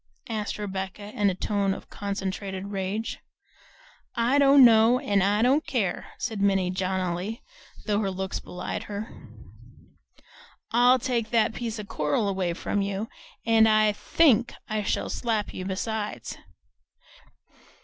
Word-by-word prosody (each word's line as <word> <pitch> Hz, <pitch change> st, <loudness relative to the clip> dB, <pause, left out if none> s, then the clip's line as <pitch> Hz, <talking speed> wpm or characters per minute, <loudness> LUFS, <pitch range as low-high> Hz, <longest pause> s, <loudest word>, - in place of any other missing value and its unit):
asked 215 Hz, -2 st, -3 dB
Rebecca 200 Hz, 0 st, -5 dB
in 205 Hz, -1 st, +2 dB
a 185 Hz, -, -2 dB
tone 200 Hz, 0 st, 0 dB
of -, -, -12 dB
concentrated 195 Hz, -1 st, -4 dB
rage. 200 Hz, +3 st, -3 dB, 1.0 s
"I 245 Hz, +4 st, +2 dB
don't 275 Hz, -1 st, +8 dB
know 225 Hz, +1 st, +6 dB
and 205 Hz, -8 st, +1 dB
I 205 Hz, +3 st, +2 dB
don't 275 Hz, +5 st, +3 dB
care," 220 Hz, -9 st, -1 dB
said 220 Hz, -4 st, -3 dB
Minnie 195 Hz, -2 st, +2 dB
jauntily, 185 Hz, +2 st, -2 dB, 0.4 s
though 210 Hz, -1 st, +1 dB
her 200 Hz, -2 st, 0 dB
looks 190 Hz, 0 st, -3 dB
belied 180 Hz, 0 st, -6 dB
her. 210 Hz, +1 st, -5 dB, 1.6 s
"I'll 245 Hz, +2 st, +5 dB
take 235 Hz, -3 st, -1 dB
that 230 Hz, -1 st, +2 dB
piece 230 Hz, -2 st, -4 dB
of 210 Hz, -1 st, -7 dB
coral 150 Hz, +7 st, 0 dB
away 190 Hz, -3 st, -1 dB
from 200 Hz, +3 st, -2 dB
you, 200 Hz, +2 st, -3 dB, 0.4 s
and 225 Hz, -1 st, +5 dB
I 215 Hz, -1 st, +4 dB
THINK 245 Hz, +1 st, +3 dB
I 215 Hz, -1 st, -1 dB
shall 205 Hz, -, -1 dB
slap 225 Hz, -4 st, -2 dB
you 185 Hz, -, -5 dB
besides!" 200 Hz, -, -3 dB
205 Hz, 135 wpm, -26 LUFS, 195-225 Hz, 1.6 s, don't